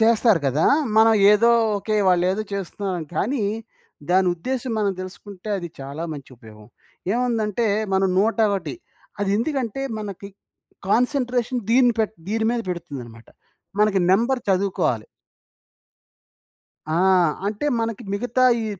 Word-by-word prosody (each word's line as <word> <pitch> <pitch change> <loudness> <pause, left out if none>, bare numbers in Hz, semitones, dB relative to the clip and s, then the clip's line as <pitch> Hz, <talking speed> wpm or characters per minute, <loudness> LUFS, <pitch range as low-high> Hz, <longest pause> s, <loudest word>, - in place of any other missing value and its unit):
చేస్తారు 225 -4 +4
గదా! 140 +4 +2 0.3
మనం 225 +1 +6 0.2
ఏదో 230 +3 +4 0.3
ఓకే. 215 +2 -2
వాళ్ళేదో 185 +3 +2
చేస్తున్నారని. 190 -3 -4
కానీ 240 +2 0 0.7
దాని 185 +1 +4
ఉద్దేశ్యం 255 +7 -3
మనం 200 -2 +1
తెలుసుకుంటే 190 +1 -9
అది 175 -2 -6
చాలా 140 +4 -6
మంచి 140 -3 -9
ఉపయోగం. 110 -2 -15 0.5
ఏముందంటే 230 -2 0 0.3
మనం 190 0 +2
101 210 - +1 0.5
అది 200 - 0
ఎందుకంటే 260 0 -2 0.2
మనకి 200 -2 -7 0.6
కాన్సంట్రేషన్ 250 +1 +1
దీని 245 0 +5
పెట్ 220 -1 0
దీని 220 +1 0
మీద 240 -1 -1
బెడుతుందన్నమాట. 135 -10 -7 0.5
మనకి 210 -2 +3
నంబర్ 235 +6 +2
చదువుకోవాలి. 185 - 0 1.9
ఆ! - - +1 0.5
అంటే 210 +7 -2
మనకి 230 0 -3
మిగతా 245 +4 0 0.2
ఈ - - -3
205 Hz, 115 wpm, -22 LUFS, 185-230 Hz, 1.9 s, మనం